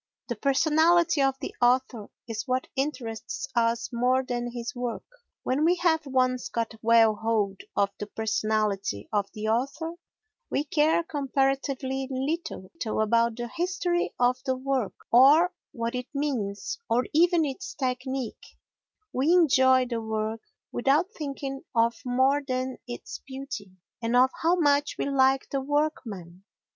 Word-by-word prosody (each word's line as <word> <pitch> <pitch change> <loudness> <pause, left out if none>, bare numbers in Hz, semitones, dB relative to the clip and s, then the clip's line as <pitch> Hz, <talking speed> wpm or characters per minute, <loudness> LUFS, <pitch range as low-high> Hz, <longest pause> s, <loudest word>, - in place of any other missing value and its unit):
The 240 - -1
personality 315 +6 +3
of 270 -1 +2
the - - -5
author 245 -3 +2 0.2
is 225 +2 -4
what 255 0 0
interests 265 -3 -3
us 230 0 +1
more 250 +2 +2
than 240 -1 -3
his 235 +2 -5
work. 245 -2 -4 0.4
When 265 +4 0
we 345 +3 +4
have 320 -4 +1
once 255 -1 +1
got 230 -1 -2
well 225 -1 +5
hold 210 -4 0
of 200 0 +2
the 210 - -4
personality 215 - -1
of 205 -1 +1
the 215 0 -3
author 275 +8 -1 0.6
we 285 - 0
care 310 +3 +2
comparatively 270 -2 -1
little 275 - -3 0.3
about 230 +1 +2
the 240 0 -3
history 350 +4 -1
of 245 +1 +3
the 260 - 0
work 260 -4 -1 0.2
or 295 +9 +6 0.2
what 230 0 -3
it 250 0 -4
means 245 - -2
or 245 +2 +2
even 340 +1 +4
its 270 -2 -5
technique; 260 -2 -4 0.6
we 275 +6 +2
enjoy 260 -7 +5
the 235 -2 -3
work 220 0 -3 0.3
without 295 - +2
thinking 275 -2 -5
of 230 0 +2
more 260 +3 +2
than 255 -1 -3
its 240 - -7
beauty, 265 -6 -6 0.3
and 230 +1 0
of 255 +1 +5
how 335 +2 +4
much 290 -4 +2
we - - -1
like 270 -1 +3
the 275 - 0
workman. 230 - -2
260 Hz, 140 wpm, -27 LUFS, 230-285 Hz, 0.6 s, or